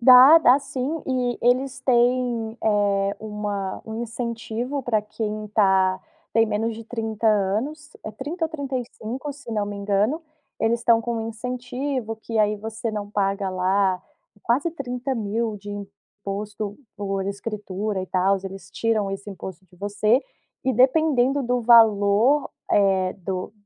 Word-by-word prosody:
Dá, 255 +6 +9
dá 270 -4 +6
sim, 275 +3 -3
e 250 -2 0
eles 255 +2 +1
têm, 245 -3 +1
eh, 200 -2 +2
uma 210 -3 -4
um 220 +1 -4
incentivo 235 +3 -4
para 230 -3 +1
quem 215 0 -4
tá 190 -2 +3 0.3
tem 225 0 +4
menos 220 +2 -1
de 230 - -8
30 225 -1 -3
anos, 220 +10 0
é 215 - -4
30 295 - -4
ou - - -13
35, 265 -2 -5
se 280 -4 -11
não 210 -2 0
me 205 0 -5
engano, 205 +10 0 0.4
eles 230 +1 +1
estão 235 -1 +4
com 235 0 -2
um 225 0 -3
incentivo 250 +1 -4
que, 220 +1 -4
aí, 210 0 +3
você 220 +2 -4
não 205 -1 -5
paga 195 -1 0
lá 185 0 +1 0.4
quase 265 +8 +1
30.000 245 -6 -2
de 205 - -11
imposto 205 +1 -6 0.2
por 195 -1 -2
escritura 200 0 -3
e - - -6
tals, 190 +1 +1
eles 195 0 -8
tiram 215 -3 0
esse 195 +1 -6
imposto 190 -1 -8
de 180 - -22
você 205 +5 +2 0.4
e 260 - +2
dependendo 270 +1 +3
do 245 0 +1
valor, 225 +3 +5 0.2
eh, 190 -2 +3
do 185 +1 -4
220 Hz, 145 wpm, -24 LUFS, 200-250 Hz, 0.4 s, Dá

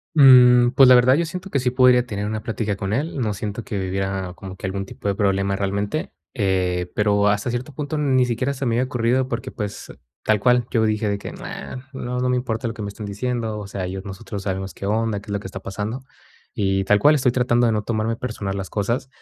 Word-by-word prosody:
Mmm, 125 -3 +7
pues, 130 0 +7
la - - +9
verdad, 125 +1 +6
yo 170 +3 +2
siento 180 +4 -6
que 140 - +1
sí 125 -1 +1
podría 125 -1 +5
tener 105 -2 -3
una 110 0 -3
plática 110 -3 -2
con 100 +1 -3
él, 145 +4 -2
no 110 -4 0
siento 105 +2 -5
que 95 -3 -3
hubiera 95 -1 -3
como 95 +1 -9
que 95 - -5
algún 95 +1 -3
tipo 100 - -6
de 100 - +1
problema 100 -1 +1
realmente, 100 +8 -2 0.2
eh, 90 -4 0
pero 105 -1 +2
hasta 105 +4 0
cierto 120 +5 -4
punto 150 +3 -4
ni 130 -4 +2
siquiera 125 +4 -1
se 135 0 -4
me 115 - +1
había 125 +2 +2
ocurrido 125 +1 +1
porque, 115 -2 -4
pues, 105 -1 -6 0.3
tal 110 -1 +2
cual, 125 +2 +3
yo 110 -2 +2
dije 110 0 0
de 100 - 0
que: - - -7
"Na, 130 +1 -8
no, 125 -1 -4
no 125 - +1
me 125 - +2
importa 120 -1 -2
lo 115 - -5
que 110 - -7
me 100 - -4
estén 105 +1 -7
diciendo, 110 +1 -3
o 105 - -6
sea, 95 -1 -4
yo 95 +1 -5
nosotros 100 +1 -7
sabemos 95 0 -4
qué - - -9
onda, 110 0 0
qué 105 - -18
es 100 - -4
lo 100 - -1
que 95 - -8
está 95 0 -7
pasando". 105 +7 -5 0.5
Y 95 -1 0
tal 105 +1 +4
cual, 150 +8 +5
estoy 125 -4 +2
tratando 120 -1 +2
de 115 - +2
no 105 -1 0
tomarme 115 +1 -1
personal 105 -5 -4
las 95 -1 -4
cosas. 120 +6 -2
110 Hz, 245 wpm, -22 LUFS, 100-125 Hz, 0.5 s, la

